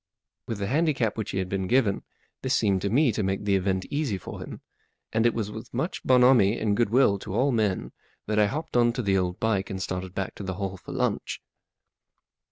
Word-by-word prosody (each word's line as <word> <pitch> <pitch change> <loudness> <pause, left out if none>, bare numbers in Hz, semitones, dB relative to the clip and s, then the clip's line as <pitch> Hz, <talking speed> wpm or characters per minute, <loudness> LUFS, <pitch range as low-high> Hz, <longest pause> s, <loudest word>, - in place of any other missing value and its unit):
With 115 - -3
the 100 - -2
handicap 135 -3 +1
which 110 - -4
he - - -3
had 95 -1 -1
been 95 0 -2
given, 115 -3 +2 0.4
this 130 0 +1
seemed 100 -4 +2
to 100 - -1
me 130 +4 +3
to 105 - -2
make 95 +1 -1
the 100 -1 +3
event 95 -1 0
easy 140 -9 -1
for 95 - -8
him, - - -8 0.5
and 110 +1 +3
it 120 - +1
was 105 -2 -2
with 110 +1 -9
much 135 +9 -2
bonhomie 125 -4 +5
and 105 -2 +1
goodwill 115 -2 +3
to 100 0 -6
all 135 +5 +3
men 105 -5 0 0.3
that 105 0 0
I 105 - +5
hopped 155 +8 -5
on 120 -1 +4
to 125 - -3
the 100 -2 +2
old 90 -1 0
bike 100 -3 0
and 95 -2 -4
started 95 0 -4
back 95 - -3
to - - -6
the 95 -1 -4
Hall 95 0 -3
for - - -11
lunch. - - -1
105 Hz, 220 wpm, -26 LUFS, 95-120 Hz, 0.5 s, bonhomie